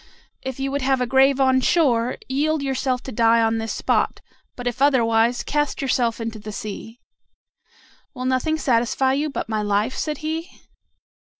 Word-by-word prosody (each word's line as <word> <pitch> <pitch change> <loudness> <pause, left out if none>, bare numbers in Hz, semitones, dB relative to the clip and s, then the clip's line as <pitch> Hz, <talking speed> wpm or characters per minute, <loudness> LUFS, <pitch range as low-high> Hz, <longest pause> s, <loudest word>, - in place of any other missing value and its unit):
If 265 0 -6
you 270 0 -2
would 280 +1 -1
have 265 0 +1
a 250 - +1
grave 265 +2 +3
on 260 -1 +3
shore, 250 -6 +2
yield 295 +3 0
yourself 265 -1 -1
to 265 - -7
die 230 0 +3
on 225 0 +1
this 225 0 -3
spot; - - 0 0.4
but 245 - -8
if 245 +1 -3
otherwise, 235 -4 +3
cast 295 0 -1
yourself 245 -4 0
into 225 -1 -5
the 215 +1 -8
sea." 215 +3 -7 1.2
"Will 255 0 -5
nothing 260 +5 +1
satisfy 260 -1 +1
you 295 +3 0
but 280 - -4
my 215 -1 -1
life?" 210 +4 0
said 305 -2 -3
he. 325 +3 -3
255 Hz, 170 wpm, -22 LUFS, 230-275 Hz, 1.2 s, grave